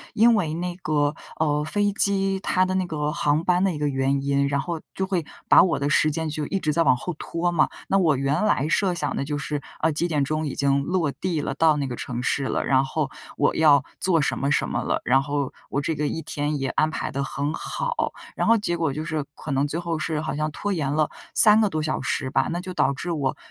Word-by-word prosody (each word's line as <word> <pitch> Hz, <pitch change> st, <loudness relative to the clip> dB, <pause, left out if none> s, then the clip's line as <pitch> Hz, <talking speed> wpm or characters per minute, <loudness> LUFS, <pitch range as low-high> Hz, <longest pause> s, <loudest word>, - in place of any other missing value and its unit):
因 230 Hz, +2 st, +6 dB
为 165 Hz, -8 st, 0 dB
那 175 Hz, +1 st, -3 dB
个， 150 Hz, -4 st, 0 dB, 0.3 s
呃， 150 Hz, -1 st, +1 dB
飞 205 Hz, +6 st, 0 dB
机 195 Hz, -1 st, +2 dB
它 185 Hz, -1 st, +2 dB
的 185 Hz, -, -2 dB
那 185 Hz, -1 st, 0 dB
个 150 Hz, -2 st, -2 dB
航 150 Hz, 0 st, +1 dB
班 180 Hz, +1 st, +2 dB
的 195 Hz, -, +2 dB
一 160 Hz, -, -5 dB
个 150 Hz, 0 st, 0 dB
原 135 Hz, 0 st, 0 dB
因， 140 Hz, 0 st, +1 dB
然 140 Hz, 0 st, 0 dB
后 170 Hz, +1 st, -4 dB
就 190 Hz, -, -1 dB
会 185 Hz, -4 st, -1 dB, 0.2 s
把 -, -, +8 dB
我 185 Hz, -, +2 dB
的 145 Hz, +1 st, -1 dB
时 155 Hz, -, +4 dB
间 160 Hz, +2 st, -2 dB
就 150 Hz, 0 st, -3 dB
一 195 Hz, -, -1 dB
直 150 Hz, -3 st, 0 dB
在 170 Hz, -, +2 dB
往 130 Hz, -6 st, +4 dB
后 180 Hz, +9 st, -4 dB
拖 175 Hz, +1 st, -1 dB
嘛， 170 Hz, -, +2 dB, 0.2 s
那 195 Hz, -, +3 dB
我 155 Hz, -7 st, +3 dB
原 140 Hz, +7 st, 0 dB
来 150 Hz, -8 st, +2 dB
设 180 Hz, +2 st, +1 dB
想 145 Hz, -4 st, -2 dB
的 -, -, -1 dB
就 145 Hz, +1 st, -3 dB
是， 145 Hz, 0 st, -3 dB, 0.2 s
呃， 160 Hz, -, +3 dB
几 165 Hz, +4 st, 0 dB
点 150 Hz, -4 st, 0 dB
钟 155 Hz, +2 st, -1 dB
已 135 Hz, -, -5 dB
经 140 Hz, 0 st, +2 dB
落 170 Hz, -1 st, 0 dB
地 175 Hz, +1 st, -2 dB
了， 135 Hz, -, -2 dB
到 155 Hz, +1 st, +3 dB
那 140 Hz, -, -1 dB
个 125 Hz, -2 st, -4 dB
城 125 Hz, +1 st, -5 dB
市 135 Hz, +1 st, 0 dB
了， -, -, -1 dB
然 130 Hz, 0 st, +3 dB
后 140 Hz, +1 st, -2 dB, 0.3 s
我 -, -, +2 dB
要 145 Hz, -3 st, +5 dB, 0.2 s
做 180 Hz, -3 st, +2 dB
什 -, -, -1 dB
么 140 Hz, +1 st, 0 dB
什 -, -, +2 dB
么 -, -, -2 dB
了， -, -, -1 dB
然 135 Hz, +2 st, +4 dB
后 140 Hz, -1 st, -2 dB, 0.2 s
我 140 Hz, -, -1 dB
这 160 Hz, -, -1 dB
个 150 Hz, 0 st, -1 dB
一 160 Hz, -, -4 dB
天 145 Hz, 0 st, -2 dB
也 135 Hz, -, -1 dB
安 155 Hz, +4 st, +1 dB
排 -, -, -4 dB
得 140 Hz, 0 st, -2 dB
很 140 Hz, +2 st, -3 dB
好。 -, -, -2 dB, 0.2 s
然 -, -, 0 dB
后 230 Hz, -, +6 dB
结 185 Hz, -5 st, -1 dB
果 165 Hz, -4 st, 0 dB
就 155 Hz, +3 st, -4 dB
是 155 Hz, -3 st, -2 dB
可 150 Hz, -, -7 dB
能 140 Hz, +2 st, +1 dB
最 155 Hz, +3 st, -3 dB
后 170 Hz, -2 st, -3 dB
是 155 Hz, 0 st, -2 dB
好 155 Hz, -1 st, -3 dB
像 155 Hz, +1 st, -1 dB
拖 200 Hz, +5 st, -3 dB
延 145 Hz, -6 st, -1 dB
了 150 Hz, 0 st, +1 dB, 0.3 s
3 215 Hz, 0 st, +8 dB
个 210 Hz, -, +3 dB
多 155 Hz, -4 st, -2 dB
小 155 Hz, -, -2 dB
时 -, -, -1 dB
吧， -, -, +2 dB
那 175 Hz, -, -2 dB
就 185 Hz, 0 st, -6 dB
导 140 Hz, -, +2 dB
致 170 Hz, +5 st, -4 dB
我， 140 Hz, -5 st, -1 dB
155 Hz, 275 characters per minute, -24 LUFS, 140-175 Hz, 0.3 s, 把